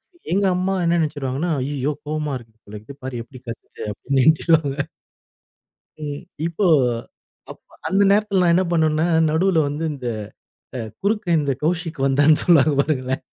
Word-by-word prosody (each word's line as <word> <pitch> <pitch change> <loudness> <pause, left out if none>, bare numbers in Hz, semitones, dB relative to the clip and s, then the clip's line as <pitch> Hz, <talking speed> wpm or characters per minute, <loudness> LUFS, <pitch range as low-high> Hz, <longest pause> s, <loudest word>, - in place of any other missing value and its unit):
அ, - - -23 0.2
எங்க 200 +1 +2
அம்மா 190 +1 0
என்ன 170 0 +2
நினச்சுருவாங்கன்னா, 145 +1 -2
"ஐயயோ! 145 +1 -2
கோவமா 150 -2 -2
இருக்குது 110 -2 -20
போல 105 +1 -9
இது. 140 +5 -11
பாரு 125 -3 -4
எப்டி 130 +2 -14
கத்துது" 115 - -8
அப்டீன்னு 135 +5 0
நினைச்சிடுவாங்க. 160 -2 +3 1.3
ம். 145 -1 -5 0.2
இப்போ, 170 +4 0 0.8
அப்ப - - -10 0.3
அந்த 195 +1 +3
நேரத்தில 205 -2 +2
நான் 170 - +4
என்ன 185 +2 +3
பண்ணவேன்னா, 160 0 +2 0.2
நடுவுல 170 +2 +2
வந்து 150 +3 -4
இந்த 125 -3 -5 0.7
அ 125 - -3 0.2
"குறுக்க 210 0 0
இந்த 140 -2 0
கௌசிக் 165 -1 -1
வந்தான்னு" 145 +3 +4
சொல்லுவாங்க 155 -4 +5
பாருங்களேன். 130 -3 -1
155 Hz, 150 wpm, -21 LUFS, 135-170 Hz, 1.3 s, சொல்லுவாங்க